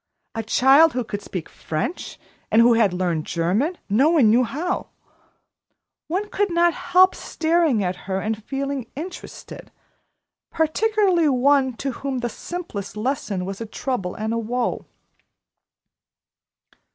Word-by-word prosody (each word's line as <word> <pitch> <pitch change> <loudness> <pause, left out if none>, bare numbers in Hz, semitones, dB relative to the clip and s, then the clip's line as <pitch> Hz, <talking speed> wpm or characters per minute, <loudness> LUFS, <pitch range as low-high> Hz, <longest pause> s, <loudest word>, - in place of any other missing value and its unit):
A 225 - -2
child 270 +8 +5
who 250 0 -1
could 205 -2 -5
speak 180 -4 -6
French, 160 - -5 0.3
and 220 - +4
who 240 0 +6
had 225 -4 +3
learned 175 -3 -2
German, 200 - 0
no 250 +10 +3
one 285 -11 +5
knew 245 +3 +4
how! 335 +10 -3 1.2
One 380 +6 -2
could 405 0 0
not 340 0 +3
help 370 +1 +4
staring 320 -9 +1
at 180 0 -1
her 190 0 0
and 215 +1 -3
feeling 275 -1 -3
interested, 335 +6 -9 0.8
particularly 360 0 +2
one 265 0 +3
to 270 +3 -4
whom 270 +1 -4
the 240 - -2
simplest 220 - -6
lesson 210 -6 -2
was 195 +3 -6
a 225 - -4
trouble 215 -5 -3
and 220 0 -3
a 230 - 0
woe. 240 +2 -2
255 Hz, 135 wpm, -22 LUFS, 210-320 Hz, 1.2 s, who